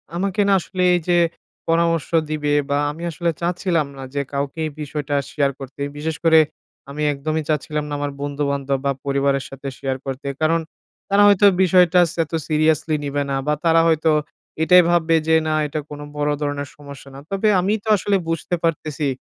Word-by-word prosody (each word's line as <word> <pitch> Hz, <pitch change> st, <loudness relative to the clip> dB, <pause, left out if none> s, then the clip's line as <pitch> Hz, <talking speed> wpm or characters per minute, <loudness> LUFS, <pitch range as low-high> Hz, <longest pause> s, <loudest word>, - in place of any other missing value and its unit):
আমাকে 195 Hz, +3 st, 0 dB
না -, -, +5 dB
আসলে 185 Hz, +1 st, -5 dB
এই -, -, +1 dB
যে 175 Hz, -1 st, +3 dB, 0.5 s
পরামর্শ 165 Hz, -2 st, +1 dB, 0.2 s
দিবে 150 Hz, -1 st, -1 dB, 0.2 s
বা 140 Hz, -, +1 dB
আমি 160 Hz, +3 st, -9 dB
আসলে 170 Hz, +1 st, -1 dB
চাচ্ছিলাম 170 Hz, -3 st, 0 dB
না 135 Hz, -, -7 dB
যে 140 Hz, -, 0 dB
কাউকে 140 Hz, +2 st, -3 dB
এই 155 Hz, -, -4 dB
বিষয়টা 145 Hz, -1 st, -3 dB, 0.2 s
শেয়ার 140 Hz, -2 st, +1 dB
করতে। 135 Hz, +1 st, -9 dB, 0.2 s
বিশেষ 160 Hz, +2 st, -3 dB
করে 160 Hz, -1 st, +6 dB, 0.5 s
আমি 145 Hz, +2 st, -6 dB
একদমই 155 Hz, +3 st, -2 dB
চাচ্ছিলাম 150 Hz, 0 st, -1 dB
না -, -, -4 dB
আমার 145 Hz, 0 st, -2 dB
বন্ধু-বান্ধব 140 Hz, -1 st, -1 dB
বা 140 Hz, -, +2 dB
পরিবারের 140 Hz, 0 st, +1 dB
সাথে 135 Hz, +1 st, -8 dB
শেয়ার 135 Hz, -1 st, -3 dB
করতে। 135 Hz, +1 st, -5 dB
কারণ 165 Hz, +1 st, +3 dB, 0.5 s
তারা 200 Hz, +1 st, +5 dB
হয়তো 205 Hz, 0 st, +5 dB, 0.2 s
বিষয়টা 180 Hz, -1 st, +5 dB
স -, -, -8 dB
এত 155 Hz, -, -14 dB, 0.2 s
সিরিয়াসলি 155 Hz, 0 st, +1 dB
নিবে 145 Hz, 0 st, -1 dB
না। 135 Hz, -, 0 dB
বা 150 Hz, -, +3 dB
তারা 165 Hz, 0 st, +5 dB
হয়তো 160 Hz, 0 st, +2 dB, 0.5 s
এটাই 180 Hz, +2 st, +7 dB
ভাববে 165 Hz, -1 st, +3 dB
যে 160 Hz, -, +4 dB
না 155 Hz, -, +1 dB
এটা 150 Hz, +1 st, -3 dB
কোনো 145 Hz, 0 st, -8 dB
বড় 150 Hz, 0 st, +1 dB
ধরনের 145 Hz, -1 st, -3 dB
সমস্যা 140 Hz, -1 st, -11 dB
না। -, -, -8 dB
তবে 195 Hz, +2 st, 0 dB
আমিই 205 Hz, +4 st, 0 dB
তো -, -, -13 dB
আসলে 200 Hz, +2 st, 0 dB
বুঝতে 165 Hz, +2 st, -1 dB
পারতেছি 155 Hz, -2 st, -1 dB
155 Hz, 185 wpm, -21 LUFS, 145-170 Hz, 0.5 s, এটাই